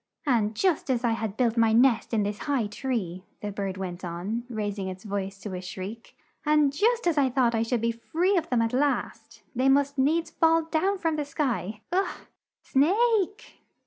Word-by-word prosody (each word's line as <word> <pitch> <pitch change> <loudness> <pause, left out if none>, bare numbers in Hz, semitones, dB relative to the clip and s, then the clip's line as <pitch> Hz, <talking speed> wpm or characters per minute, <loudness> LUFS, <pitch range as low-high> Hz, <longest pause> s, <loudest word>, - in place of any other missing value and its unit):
"And 225 -6 +1
just 350 - +1
as 250 -2 +1
I 235 - +2
had 220 -2 -3
built 240 -2 +1
my 225 -1 +4
nest 240 0 +4
in 220 -3 +2
this 205 +1 -3
high 270 -6 +2
tree," 205 -5 -3 0.2
the 210 - -4
bird 195 -2 -4
went 185 -1 -5
on, 185 +7 -4
rais 210 -3 -3
ing 190 - -3
its 185 0 -7
voice 195 -2 -4
to 205 - -6
a 180 - -4
shriek, 190 +5 -8 0.3
"and 300 -2 +3
just 460 +7 +2
as 330 -4 +2
I 270 -2 +3
thought 250 -2 +2
I 225 - +1
should 230 0 0
be 230 0 +1
free 335 +12 0
of 345 - 0
them 240 -2 +2
at 230 - -1
last, 280 +2 -1
they 260 +2 +3
must 280 0 +2
needs 320 +5 +2
fall 325 0 +3
down 340 +5 0
from 325 -3 -1
the 300 - 0
sky! 245 -8 -2
Ugh! 380 +2 -1 0.4
Snake!" 410 - +1
240 Hz, 200 wpm, -27 LUFS, 210-300 Hz, 0.4 s, my